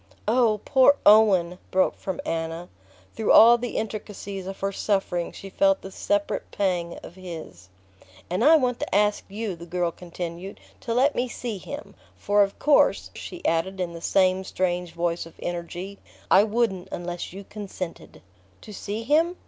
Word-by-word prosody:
"Oh, 220 Hz, -2 st, +3 dB
poor 265 Hz, +1 st, +5 dB
Owen!" 190 Hz, -5 st, +5 dB
broke 185 Hz, 0 st, +2 dB
from 190 Hz, -3 st, -5 dB
Anna. 165 Hz, +1 st, -3 dB, 0.5 s
Through 220 Hz, -, +1 dB
all 235 Hz, +2 st, +8 dB
the 245 Hz, 0 st, -4 dB
intricacies 205 Hz, -3 st, -5 dB
of 195 Hz, -, -7 dB
her 195 Hz, 0 st, 0 dB
suffering 195 Hz, -4 st, -1 dB
she 195 Hz, -, -10 dB
felt 195 Hz, 0 st, +2 dB
the 195 Hz, -, -8 dB
separate 205 Hz, +1 st, -1 dB
pang 180 Hz, -4 st, -1 dB
of -, -, -10 dB
his. 170 Hz, -, -10 dB, 0.6 s
"And 180 Hz, +6 st, -1 dB
I 310 Hz, +4 st, +8 dB
want 250 Hz, -5 st, +1 dB
to -, -, -3 dB
ask 210 Hz, 0 st, +2 dB
you," 205 Hz, -1 st, -4 dB
the 170 Hz, +1 st, -11 dB
girl 175 Hz, 0 st, -1 dB
continued, 175 Hz, +2 st, -7 dB, 0.2 s
"to 230 Hz, -2 st, -3 dB
let 275 Hz, +4 st, +4 dB
me 250 Hz, -, -1 dB
see 235 Hz, -4 st, -5 dB
him; 285 Hz, -, -8 dB, 0.2 s
for 205 Hz, 0 st, +2 dB
of 195 Hz, -1 st, +1 dB
course," 295 Hz, -1 st, +3 dB
she 355 Hz, -, -9 dB
added 175 Hz, +4 st, 0 dB
in 175 Hz, -2 st, -2 dB
the 165 Hz, -, -8 dB
same 185 Hz, +1 st, +2 dB
strange 180 Hz, -2 st, -2 dB
voice 170 Hz, 0 st, -2 dB
of 165 Hz, -, -16 dB
energy, 175 Hz, +3 st, -5 dB, 0.3 s
"I 195 Hz, +3 st, +7 dB
wouldn't 210 Hz, -5 st, 0 dB
unless 175 Hz, 0 st, -5 dB
you 195 Hz, +3 st, -9 dB
consented." 195 Hz, -4 st, -8 dB, 0.4 s
"To 215 Hz, -, -11 dB
see 210 Hz, +3 st, -5 dB
him?" 325 Hz, +7 st, +2 dB
195 Hz, 165 wpm, -25 LUFS, 175-220 Hz, 0.6 s, all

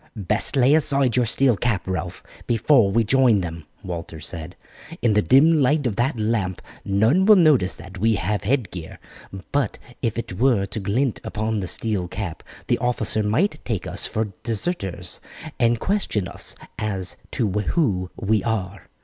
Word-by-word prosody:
"Best 105 Hz, +6 st, 0 dB
lay 135 Hz, +1 st, +5 dB
aside 140 Hz, -5 st, +2 dB
your 125 Hz, -2 st, +2 dB
steel 130 Hz, +1 st, +3 dB
cap, 110 Hz, -2 st, -1 dB
Ralph, 95 Hz, -1 st, -4 dB, 0.2 s
before 120 Hz, -1 st, +4 dB
we 115 Hz, +4 st, +2 dB
join 120 Hz, -3 st, +4 dB
them," 85 Hz, -3 st, -6 dB, 0.2 s
Walter 85 Hz, -3 st, -6 dB
said. 80 Hz, +3 st, -6 dB, 0.5 s
"In 115 Hz, -3 st, +4 dB
the 105 Hz, -, +4 dB
dim 150 Hz, +7 st, +5 dB
light 145 Hz, +2 st, +2 dB
of 115 Hz, -5 st, 0 dB
that 120 Hz, +2 st, 0 dB
lamp 105 Hz, -4 st, -1 dB, 0.2 s
none 110 Hz, -, +3 dB
will 215 Hz, -, +9 dB
notice 150 Hz, -, +4 dB
that 95 Hz, 0 st, -11 dB
we 110 Hz, +2 st, +3 dB
have 105 Hz, 0 st, -1 dB
head 115 Hz, -2 st, 0 dB
gear, 85 Hz, -3 st, -8 dB, 0.5 s
but 140 Hz, -6 st, 0 dB, 0.2 s
if 115 Hz, -2 st, -1 dB
it 100 Hz, -5 st, -5 dB
were 120 Hz, -6 st, +3 dB
to 100 Hz, -, -5 dB
glint 110 Hz, +6 st, -1 dB
upon 110 Hz, 0 st, -2 dB
the 95 Hz, -, -3 dB
steel 100 Hz, -2 st, -1 dB
cap 90 Hz, -3 st, -5 dB, 0.2 s
the -, -, +1 dB
officer 115 Hz, -3 st, 0 dB
might 150 Hz, -, 0 dB
take 110 Hz, -7 st, -3 dB
us 90 Hz, +2 st, -1 dB
for 110 Hz, -3 st, -3 dB
deserters 115 Hz, -, -3 dB, 0.4 s
and 120 Hz, -2 st, +3 dB
question 180 Hz, -, 0 dB
us -, -, -2 dB, 0.2 s
as 95 Hz, -5 st, -1 dB
to 115 Hz, -, -1 dB
who 105 Hz, -, 0 dB
we 105 Hz, -1 st, +1 dB
are." 100 Hz, -4 st, -3 dB
110 Hz, 165 wpm, -23 LUFS, 95-125 Hz, 0.5 s, will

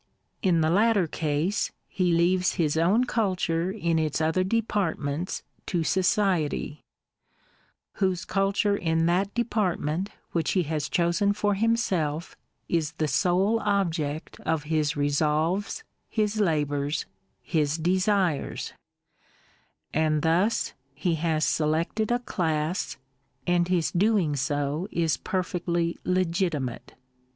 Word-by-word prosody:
In 175 Hz, -4 st, +3 dB
the 155 Hz, 0 st, +2 dB
latter 205 Hz, 0 st, +4 dB
case, 160 Hz, +5 st, -1 dB, 0.2 s
he 180 Hz, -2 st, 0 dB
leaves 180 Hz, +2 st, +3 dB
his 155 Hz, -3 st, +1 dB
own 185 Hz, +9 st, +3 dB
culture 185 Hz, -7 st, 0 dB
in 170 Hz, -5 st, 0 dB
its 155 Hz, -1 st, 0 dB
other 160 Hz, +3 st, +2 dB
departments 185 Hz, -7 st, -1 dB, 0.2 s
to 175 Hz, -3 st, 0 dB
Society; 180 Hz, -5 st, +1 dB, 1.2 s
whose 185 Hz, -2 st, +1 dB
cul 195 Hz, 0 st, +1 dB
ture 200 Hz, +1 st, +2 dB
in 165 Hz, -3 st, +1 dB
that 185 Hz, +4 st, +1 dB
department 195 Hz, -6 st, 0 dB, 0.2 s
which 165 Hz, -3 st, 0 dB
he 185 Hz, -, +2 dB
has 150 Hz, -2 st, -2 dB
chosen 175 Hz, +4 st, +2 dB
for 205 Hz, 0 st, +1 dB
himself 190 Hz, -8 st, 0 dB, 0.3 s
is 160 Hz, -2 st, 0 dB
the 155 Hz, 0 st, -1 dB
sole 180 Hz, -, +2 dB
object 170 Hz, -8 st, -1 dB
of 160 Hz, -2 st, -1 dB
his 155 Hz, 0 st, 0 dB
resolves, 155 Hz, -, 0 dB, 0.3 s
his 215 Hz, -1 st, 0 dB
labours, 145 Hz, -4 st, 0 dB, 0.4 s
his 155 Hz, -2 st, 0 dB
desires; 185 Hz, -1 st, 0 dB, 0.6 s
— -, -, -36 dB
and 155 Hz, -1 st, +1 dB
thus 175 Hz, +7 st, +2 dB, 0.2 s
he 170 Hz, +4 st, 0 dB
has 160 Hz, -1 st, +1 dB
selected 160 Hz, +8 st, 0 dB
a 240 Hz, -, +3 dB
class, 165 Hz, -7 st, -2 dB, 0.5 s
and 175 Hz, -1 st, +2 dB
his 180 Hz, -3 st, +1 dB
doing 190 Hz, -5 st, +2 dB
so 145 Hz, +5 st, -1 dB
is 165 Hz, -2 st, +1 dB
perfectly 175 Hz, -2 st, -1 dB
legitimate. 170 Hz, -, -1 dB
170 Hz, 115 wpm, -26 LUFS, 155-195 Hz, 1.2 s, latter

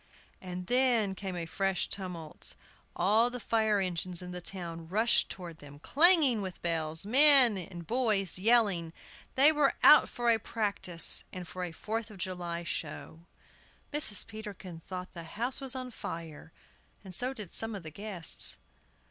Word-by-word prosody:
And 180 Hz, -1 st, -7 dB
then 245 Hz, -4 st, +1 dB
came 190 Hz, -1 st, -6 dB
a 170 Hz, -1 st, -4 dB
fresh 195 Hz, +3 st, -2 dB
tumult! 175 Hz, -5 st, -3 dB, 0.4 s
All 215 Hz, +7 st, +2 dB
the 250 Hz, 0 st, -7 dB
fire 220 Hz, -2 st, 0 dB
engines 180 Hz, -1 st, -1 dB
in 180 Hz, -, -8 dB
town 170 Hz, -3 st, -6 dB
rushed 215 Hz, +6 st, +2 dB
toward 170 Hz, -3 st, -9 dB
them, 145 Hz, 0 st, -13 dB
clanging 290 Hz, -, +5 dB
with 185 Hz, -2 st, -7 dB
bells, 160 Hz, 0 st, -1 dB
men 265 Hz, -1 st, +7 dB
and 175 Hz, -2 st, -7 dB
boys 215 Hz, -6 st, +1 dB
yelling! 200 Hz, -7 st, +2 dB, 0.4 s
They 280 Hz, +4 st, +7 dB
were 295 Hz, -3 st, +1 dB
out 300 Hz, -, +7 dB
for 240 Hz, -1 st, 0 dB
a 225 Hz, -, +2 dB
practice 200 Hz, -6 st, 0 dB
and 180 Hz, -2 st, -8 dB
for 185 Hz, +2 st, -7 dB
a 175 Hz, -, -5 dB
Fourth 220 Hz, +6 st, -5 dB
of 210 Hz, -, -13 dB
July 175 Hz, -2 st, -5 dB
show. 165 Hz, 0 st, -7 dB, 0.7 s
Mrs. 290 Hz, -10 st, +2 dB
Peterkin 205 Hz, -6 st, -9 dB
thought 180 Hz, +2 st, -8 dB
the 170 Hz, -, -8 dB
house 235 Hz, -, -4 dB
was 265 Hz, -1 st, -1 dB
on 255 Hz, -1 st, -6 dB
fire, 165 Hz, -6 st, -8 dB, 0.5 s
and 190 Hz, -2 st, -11 dB
so 250 Hz, +8 st, -1 dB
did 210 Hz, -9 st, -10 dB
some 225 Hz, -1 st, -1 dB
of 195 Hz, -, -8 dB
the 155 Hz, -, -9 dB
guests. 195 Hz, -2 st, +1 dB
195 Hz, 155 wpm, -30 LUFS, 175-230 Hz, 0.7 s, men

